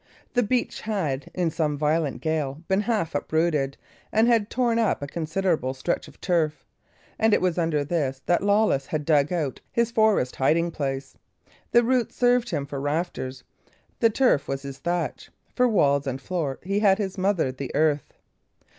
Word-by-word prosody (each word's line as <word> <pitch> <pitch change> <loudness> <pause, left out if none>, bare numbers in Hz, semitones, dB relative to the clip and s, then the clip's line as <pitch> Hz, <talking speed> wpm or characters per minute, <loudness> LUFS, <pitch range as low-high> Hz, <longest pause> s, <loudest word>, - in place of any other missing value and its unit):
The 245 - +3
beech 245 +2 -1
had, 165 -11 -2
in 175 -3 0
some 150 -3 -1
violent 150 0 0
gale, 155 -2 -2
been 190 +1 +2
half 210 -7 -1
uprooted, 150 -2 0 0.3
and 220 +2 +3
had 230 -3 +3
torn 235 -2 +1
up 215 -9 +1
a - - -3
considerable 160 -4 -1
stretch 150 +6 -2
of - - -16
turf 165 -5 0 0.5
and 220 -1 +4
it - - +2
was 180 -1 0
under 160 -3 +1
this 140 -4 -1
that 175 - +2
old 200 - -2
Lawless 200 -10 +2
had 150 -2 -3
dug 145 -1 +3
out 155 -7 -2
his 235 0 +1
forest 220 - +2
hiding 165 +5 +2
place. 135 -3 -4 0.6
The 240 - +5
roots 250 0 +1
served 245 -1 +3
him 140 - -2
for 140 -1 -5
rafters, 145 -4 -3 0.6
the 230 - +5
turf 245 - +2
was 135 0 -3
his 140 -1 -7
thatch; 175 -3 -3 0.3
for 250 0 +4
walls 140 -9 +2
and 130 0 -2
floor 150 -4 -3
he 195 +2 0
had 200 -2 +4
his 195 -3 -3
mother 185 -8 +1
the 130 +1 -6
earth. 150 -1 +1
165 Hz, 175 wpm, -25 LUFS, 140-205 Hz, 0.6 s, The